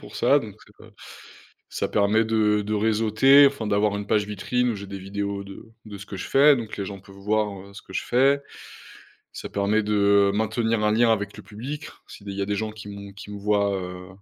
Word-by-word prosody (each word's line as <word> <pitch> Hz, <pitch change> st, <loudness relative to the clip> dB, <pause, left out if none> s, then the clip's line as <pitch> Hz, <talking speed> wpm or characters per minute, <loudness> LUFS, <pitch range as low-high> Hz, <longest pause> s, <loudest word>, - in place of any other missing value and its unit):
pour -, -, -11 dB
ça, -, -, +4 dB
donc -, -, -9 dB
c'est -, -, -21 dB
pas -, -, -15 dB, 0.8 s
ça -, -, -2 dB
permet 105 Hz, +2 st, +2 dB
de 105 Hz, -2 st, +2 dB
de 105 Hz, +1 st, -3 dB
réseauter, 110 Hz, +6 st, +5 dB
enfin, 135 Hz, -5 st, -4 dB
d'avoir 100 Hz, 0 st, +1 dB
une 100 Hz, -, -5 dB
page 105 Hz, -1 st, +1 dB
vitrine 125 Hz, +4 st, -1 dB
où 115 Hz, -, -2 dB
j'ai 100 Hz, 0 st, -7 dB
des 100 Hz, 0 st, -8 dB
vidéos 100 Hz, +1 st, -4 dB
de 100 Hz, 0 st, -11 dB, 0.2 s
de 105 Hz, -2 st, -9 dB
ce 100 Hz, -, -10 dB
que 100 Hz, -, -8 dB
je 90 Hz, -, -6 dB
fais, 140 Hz, +1 st, +6 dB
donc 115 Hz, -3 st, -6 dB
les 100 Hz, -, -3 dB
gens 100 Hz, 0 st, -7 dB
peuvent 95 Hz, +1 st, -16 dB
voir, 100 Hz, -1 st, -2 dB
heu, 100 Hz, -, -16 dB
ce 100 Hz, -, -10 dB
que 95 Hz, -, -15 dB
je -, -, -2 dB
fais. 135 Hz, +3 st, +3 dB, 0.9 s
Ça -, -, -7 dB
permet 100 Hz, +2 st, +1 dB
de 100 Hz, -1 st, +3 dB
maintenir 110 Hz, +1 st, 0 dB
un 105 Hz, -, +3 dB
lien 115 Hz, +1 st, +3 dB
avec 100 Hz, -2 st, -1 dB
le -, -, -11 dB
public, 135 Hz, +8 st, -7 dB, 0.2 s
si -, -, -13 dB
des 100 Hz, -, -6 dB
il 100 Hz, -, -7 dB
y -, -, -2 dB
a -, -, 0 dB
des 105 Hz, +1 st, -1 dB
gens 110 Hz, +1 st, -3 dB
qui 105 Hz, -1 st, -11 dB
m'ont, 100 Hz, 0 st, -9 dB
qui 100 Hz, +1 st, -12 dB
me 105 Hz, -, -7 dB
voient, 100 Hz, 0 st, +1 dB
heu, 90 Hz, 0 st, -7 dB
105 Hz, 240 wpm, -24 LUFS, 100-110 Hz, 0.9 s, fais